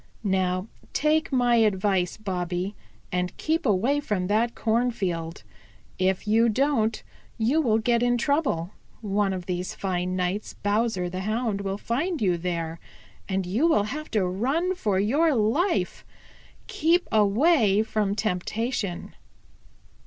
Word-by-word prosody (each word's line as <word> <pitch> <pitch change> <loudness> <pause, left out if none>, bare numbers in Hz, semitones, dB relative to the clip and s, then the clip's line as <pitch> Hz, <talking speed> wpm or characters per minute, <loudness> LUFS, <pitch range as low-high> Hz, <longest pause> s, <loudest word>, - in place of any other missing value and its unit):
Now 185 -1 0 0.3
take 310 +1 +1
my 245 -2 +3
advice, 195 -4 +1
Bobby, 185 -1 -3 0.4
and 180 0 -2
keep 320 -2 0
away 230 +8 +2
from 210 -10 -2
that 220 +5 +1
cornfield. 195 - -1 0.6
If 190 +2 0
you 225 +2 +4
don't, 225 -2 +1 0.3
you 250 +8 +2
will 225 -7 +2
get 235 +1 +1
in 245 0 +2
trouble. 240 - 0 0.3
One 205 -2 0
of 185 -2 -4
these 180 0 -3
fine 185 -1 -2
nights 185 +3 -2
Bowser 205 -3 0
the 185 +1 -5
Hound 215 +1 -1
will 195 0 -3
find 305 - -2
you 185 -6 +2
there 170 -1 -3 0.5
and 190 -1 -1
you 220 - +1
will 260 -11 +3
have 305 +1 -6
to 195 - +2
run 270 - 0
for 205 - 0
your 285 +9 +2
life. 280 - 0 0.6
Keep 355 -5 +1
away 215 - +4
from 210 -2 -1
temptation." 205 0 -2
210 Hz, 130 wpm, -25 LUFS, 185-245 Hz, 0.6 s, you